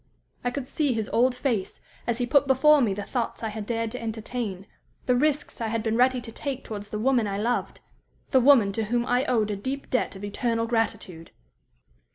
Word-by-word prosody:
I 245 - +1
could 255 +1 -5
see 290 -2 0
his 220 -2 -2
old 250 +2 +3
face, 240 -7 -2 0.3
as 235 -1 0
he 245 - 0
put 280 +3 +3
before 290 +2 +5
me 210 -6 +1
the 205 - -4
thoughts 235 +2 -3
I 225 - -1
had 210 -1 -6
dared 230 -1 -1
to 250 - -6
entertain, 220 -3 -4 0.4
the 250 - +3
risks 290 0 0
I 225 - 0
had 225 0 -2
been 225 -1 0
ready 250 +1 +3
to 235 -1 -8
take 270 +2 -4
towards 205 -1 -7
the 210 - -4
woman 240 -1 +2
I 200 0 -2
loved 235 +4 -1 0.5
the 260 - +5
woman 240 -6 +6
to 220 +2 -2
whom 240 +2 0
I 250 +1 +1
owed 220 -4 +1
a - - -1
deep 265 +8 -5
debt 250 - 0
of 190 - -9
eternal 230 +3 -1
gratitude. 220 -7 -2
235 Hz, 210 wpm, -26 LUFS, 215-255 Hz, 0.5 s, woman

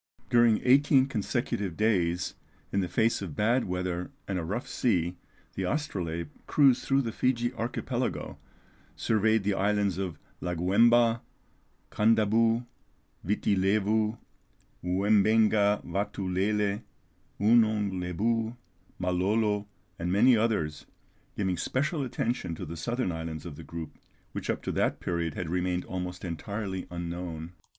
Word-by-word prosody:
During 120 -2 +5
eighteen 135 +1 +5
consecutive 100 -6 -2
days, 90 -5 +1 0.4
in 100 - +1
the 95 - 0
face 115 +3 +1
of 85 -7 -6
bad 115 +4 +2
weather 90 -1 -2 0.2
and 95 -2 -1
a - - -3
rough 105 +9 -3
sea, 90 -7 0 0.4
the 95 - -2
Astrolabe 85 - -3 0.2
cruised 135 -4 +4
through 135 0 +2
the 115 - -3
Fiji 120 +1 0
Archipelago, 125 +1 -3 0.6
surveyed 110 0 +2
the 100 +1 +1
islands 100 -1 +1
of 90 -6 -3 0.2
Laguemba, 115 +7 +3 0.7
Kandabou, 115 +2 +3 0.6
Viti 100 +1 +1
Levou, 105 +3 +2 0.7
Oumbenga 105 +2 +3
Vatou 100 0 -3
Lele, 100 +1 +1 0.6
Ounong 110 -2 +4
Lebou, 110 +6 -1 0.4
Malolo, 100 +3 +1 0.3
and 85 +1 -1
many 120 +6 +6
others, 105 -10 0 0.5
giving 95 -3 0
special 145 - -1
attention 120 -8 -2
to - - -6
the 85 - -6
southern 120 +5 -1
islands 80 -1 -5
of 85 -4 -7
the - - -10
group, 85 -2 -8 0.3
which - - -5
up - - -1
to - - -2
that - - 0
period 85 -3 -2
had 90 - -3
remained 90 0 0
almost 90 0 -5
entirely 95 +2 -4
unknown. 85 -1 -5
100 Hz, 125 wpm, -28 LUFS, 90-115 Hz, 0.7 s, many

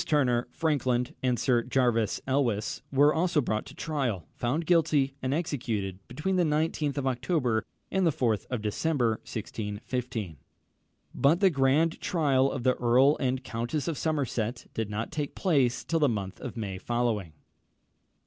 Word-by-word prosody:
Turner, 125 -6 +2
Franklin, 130 -6 0
and 125 -2 +1
Sir 125 -3 +3
Jervis 120 -3 +1
Elwes 130 -6 0
were 145 +2 +5
also 170 -1 +2
brought 110 -5 -1
to - - -12
trial, 130 - -2
found 145 +8 -1
guilty, 155 -5 +3
and 130 - -1
executed 115 - -2
between 185 +5 -1
the 180 - +4
19th 150 -2 0
of 140 - -1
October 125 -3 0 0.3
and 190 0 +1
the 170 - +4
4th 115 -7 0
of 125 -4 -3
December 115 +1 +1
1615; 110 - -4 0.8
but 155 +5 +3
the 195 -2 +5
grand 145 +3 +2
trial 135 -6 +2
of 130 - -4
the 130 0 +4
Earl 130 +5 +4
and 130 -1 -1
Countess 120 +6 -3
of 165 - -1
Somerset 130 -7 -2
did 110 -2 -2
not 105 +2 -3
take 150 -2 -3
place 140 -10 +2
till 165 - 0
the 145 -3 +4
month 100 -4 -4
of 125 -2 -6
May 100 -4 -4
following. 115 -7 -1
130 Hz, 155 wpm, -28 LUFS, 115-150 Hz, 0.8 s, were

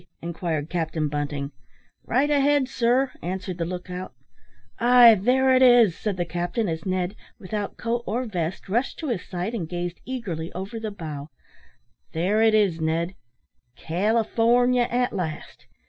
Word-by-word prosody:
inquired 165 -3 -3
Captain 160 -3 -1
Bunting. 145 -1 -3 0.5
"Right 275 +5 +1
ahead, 285 -1 +3
sir," 255 +1 +1
answered 185 0 -4
the 165 - 0
look 180 +1 -5
out. 180 +1 -6 0.7
"Ay, 240 -1 +8
there 255 +6 +3
it 255 - +4
is," 240 -8 +6
said 205 -4 -3
the 175 - -1
captain, 175 +6 -2
as 160 +1 -4
Ned, 185 +1 -1 0.2
without 205 +1 -5
coat 235 +1 -2
or 245 +5 -1
vest, 175 -5 -4
rushed 235 +7 -1
to 310 - -4
his 230 -7 -1
side, 180 +5 -4
and 175 -9 -4
gazed 175 0 -4
eagerly 190 -11 -5
over 195 +5 -5
the 220 -1 -4
bow, 155 -7 -7 0.8
"there 190 +7 +1
it 220 -1 +5
is, 190 -6 +2
Ned, 165 +3 0 0.6
California, 230 - +2
at 245 +1 0
last! 160 -5 -5
195 Hz, 150 wpm, -24 LUFS, 170-240 Hz, 0.8 s, Ay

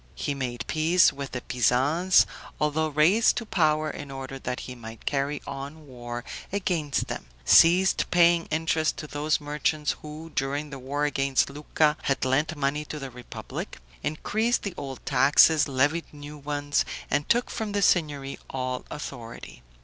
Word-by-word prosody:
He 145 - -2
made 120 -4 -4
peace 165 +3 +4
with 140 -1 -6
the 125 - -3
Pisans, 140 +11 +3 0.3
although 150 +1 +1
raised 155 +9 +4
to 235 - -3
power 155 -6 +2
in 145 -2 -6
order 135 0 -7
that 125 -1 -4
he 130 - -7
might 115 -2 -11
carry 140 +1 -1
on 140 +3 -7
war 120 -2 -7 0.3
against 175 -7 -1
them; - - -6 0.2
ceased 180 +3 +5
paying 170 -1 +4
interest 160 0 0
to - - -6
those 150 +1 0
merchants 150 0 -1
who, 155 +2 -9
during 145 +2 -2
the 135 - -7
war 140 +3 -2
against 135 -1 +1
Lucca, 150 +1 +1
had 135 -1 0
lent 150 +5 +1
money 145 +1 -1
to 150 - -6
the 135 -2 -6
republic; 125 0 -7 0.2
increased 220 +10 0
the 200 - -3
old 135 -2 -7
taxes, 145 +4 +5
levied 145 +5 0
new 145 0 -10
ones, 145 0 0 0.3
and 145 0 0
took 240 +1 +2
from 215 -3 -4
the 205 -1 +1
Signory 145 -7 +1
all 130 -1 -3
authority. 120 - -8
145 Hz, 155 wpm, -26 LUFS, 135-160 Hz, 0.3 s, ceased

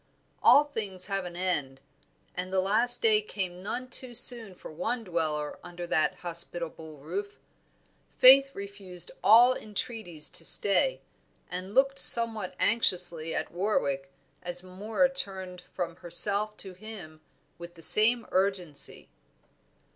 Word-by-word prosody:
All 290 - +5
things 205 -10 -3
have 195 -2 -4
an 175 -1 -10
end, 150 -8 -4 0.5
and 180 +1 -7
the 190 - -1
last 225 +6 +1
day 215 -2 +3
came 185 -4 -7
none 250 +6 -6
too 255 -1 +1
soon 230 -5 +6
for - - -13
one 225 +9 -5
dweller 155 -5 -4
under 175 0 -10
that 155 -2 -1
hospitable 170 -2 -7
roof. 405 - -8 0.8
Faith 270 +1 +6
refused 195 -3 -7
all 230 +6 +5
entreaties 210 -8 -6
to - - -6
stay, 355 - +3 0.5
and 185 +3 -8
looked 275 +1 +1
somewhat 225 -5 +5
anxiously 175 -7 -1
at - - -5
Warwick 140 -8 -3 0.3
as 175 0 -6
Moor 210 +8 -2
turned 190 -8 -5
from 170 -2 -6
herself 205 +5 +1
to 190 -2 -9
him 180 -6 -13 0.4
with 170 0 -12
the 165 - -15
same 225 +6 +5
urgency. 185 -6 -1
190 Hz, 130 wpm, -26 LUFS, 175-220 Hz, 0.8 s, soon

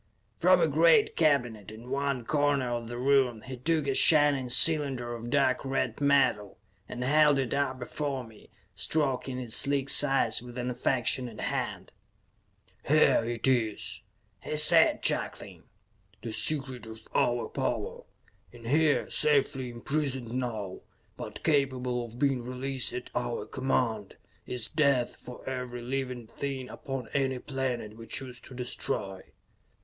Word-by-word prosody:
From - - +5
a - - +3
great 450 -3 +4
cabinet 120 -9 +1
in 115 +4 -11
one 140 -3 -1
corner 145 -3 +1
of 120 -1 -3
the 120 +1 -6
room 125 -3 +2
he 130 -1 -7
took 155 +4 0
a 135 - 0
shining 145 -3 +5
cylinder 135 -4 +4
of 120 0 -7
dark 135 -1 +2
red 135 +1 -2
metal, 135 -8 +2 0.3
and 125 - -5
held 150 +1 +4
it 130 -3 -1
up 140 -2 -1
before 135 +1 -4
him, 110 -2 -17 0.3
stroking 130 +4 -1
its 120 -3 0
sleek 140 -1 +1
sides 135 -7 +4
with 120 0 -11
an 125 0 -2
affectionate 125 -2 -1
hand. - - -3 1.0
"Here - - +4
it 115 +1 -2
is," 115 -5 -1 0.4
he 155 - -4
said, 160 +2 +6
chuckling. - - -3 0.6
"The 115 -1 -5
secret 130 -4 -1
of 110 0 -10
our 120 -2 +1
power. - - -3 0.5
In 120 -1 -14
here, 150 +4 +2
safely 140 -3 +1
imprisoned 130 0 -3
now, 110 -7 -4 0.4
but - - -8
capable 130 -5 0
of 115 0 -12
being 135 -1 +1
released 130 +1 -3
at 125 - -7
our 120 -1 -3
command, 120 -6 -2 0.3
is 125 -3 -2
death 140 -6 +1
for 125 - -11
every 125 -2 -5
living 130 -1 -4
thing 130 +2 -5
upon 135 -4 -6
any 135 -2 0
planet 125 -5 -4
we 115 0 -11
choose 125 +1 -7
to 130 - -8
destroy." 120 -6 -4
130 Hz, 140 wpm, -28 LUFS, 120-140 Hz, 1.0 s, said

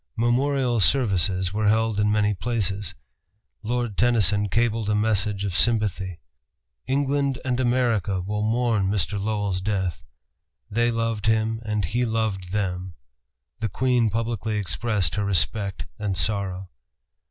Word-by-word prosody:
Memorial 125 +1 +1
services 95 - +2
were 105 0 +1
held 110 0 +2
in 105 0 +3
many 105 -1 +2
places. 100 -2 -2 0.7
Lord 120 -2 -2
Tennyson 105 -4 +3
cabled 115 0 +1
a 105 - +2
message 105 -2 0
of 95 -3 -3
sympathy: 100 -6 +1 0.7
"England 140 0 +1
and 125 -1 0
America 120 -6 +1
will 105 +3 -3
mourn 110 -2 +1
Mr. 100 0 0
Lowell's 100 -3 -1
death. 95 -4 -2 0.7
They 120 +3 +2
loved 115 -2 -1
him 110 0 +1
and 105 -3 -1
he 120 +9 0
loved 110 -6 -1
them." 90 -3 -2 0.6
The 110 -2 -1
Queen 125 +1 +2
publicly 110 -1 -2
expressed 100 -1 -1
her 105 - -1
respect 100 +2 0
and 100 -3 -2
sorrow. 95 -2 -1
105 Hz, 130 wpm, -24 LUFS, 100-115 Hz, 0.7 s, in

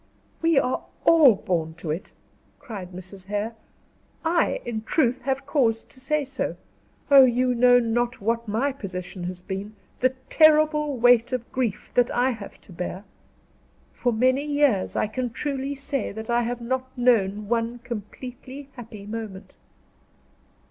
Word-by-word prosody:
"We 330 -2 +3
are 255 -1 +1 0.2
all 305 -9 +7
born 170 -6 -2
to 165 -2 -5
it," 165 +5 -5 0.5
cried 195 -6 -8
Mrs. 185 +1 -9
Hare. 210 +3 -2 0.7
"I, 335 0 +2
in 230 -2 -3
truth, 250 +1 +1
have 270 +1 -2
cause 240 -6 +1
to 260 - -15
say 290 +2 0
so. 265 0 -3 0.6
Oh, 275 -1 +10
you 250 0 +3
know 245 +1 +6
not 240 +1 0
what 230 +2 -1
my 230 +7 0
position 185 -7 -6
has 180 0 -6
been 200 +2 -5 0.2
the 255 +1 +2
terrible 305 -2 +4
weight 245 -1 +5
of 245 -2 -3
grief 240 -6 -2
that 245 -1 +3
I 255 +2 +2
have 215 -4 -9
to - - -17
bear. 180 +3 -5 0.9
For 245 - 0
many 255 +4 +2
years, 290 -9 +1
I - - +2
can 245 +3 -3
truly 275 +3 -3
say 275 0 -3
that 220 +3 -6
I 240 0 +3
have 240 +1 -3
not 260 +2 -2
known 210 -4 +2
one 230 +1 0
completely 250 +4 -8
happy 225 -5 -10
moment." 210 -3 -7
240 Hz, 150 wpm, -25 LUFS, 210-265 Hz, 0.9 s, Oh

